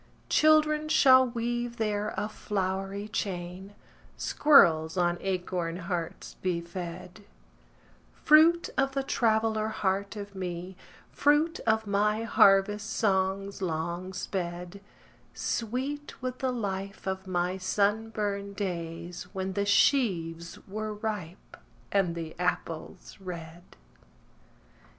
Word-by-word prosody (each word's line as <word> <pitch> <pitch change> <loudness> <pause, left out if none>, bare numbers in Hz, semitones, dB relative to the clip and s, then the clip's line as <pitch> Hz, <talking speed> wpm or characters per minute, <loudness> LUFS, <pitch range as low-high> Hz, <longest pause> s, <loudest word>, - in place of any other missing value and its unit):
Children 310 0 +4
shall 260 -4 +6
weave 240 0 -3
there 210 -1 -1
a 210 - -1
flowery 195 -1 -3
chain, 190 -1 -5 0.4
Squirrels 165 - +5
on 175 -1 +1
acorn 180 -3 -2
hearts 175 -2 -5
be 180 -2 0
fed:— 180 +3 -8 0.9
Fruit 330 +3 +5
of 270 0 +1
the 275 0 -1
traveller 220 -4 +1
heart 200 -1 -1
of 205 -1 -7
me, 180 -1 -5 0.4
Fruit 295 +3 +2
of 220 0 +2
my 210 +2 +1
harvest 205 -1 +4
songs 195 -1 0
long 170 +1 -3
sped: 180 0 -5 0.5
Sweet 265 +6 -3
with 255 0 -4
the 260 -1 0
life 195 -4 -4
of 190 0 -3
my 180 +1 -1
sunburned 205 0 -1
days 175 -2 -5
When 190 -1 -3
the 200 +1 -1
sheaves 175 - +2
were 215 +2 -4
ripe, 205 -5 -6 0.3
and 190 -4 +1
the 165 -1 -6
apples 180 -1 -3
red. 170 -3 -8
200 Hz, 105 wpm, -28 LUFS, 180-220 Hz, 0.9 s, shall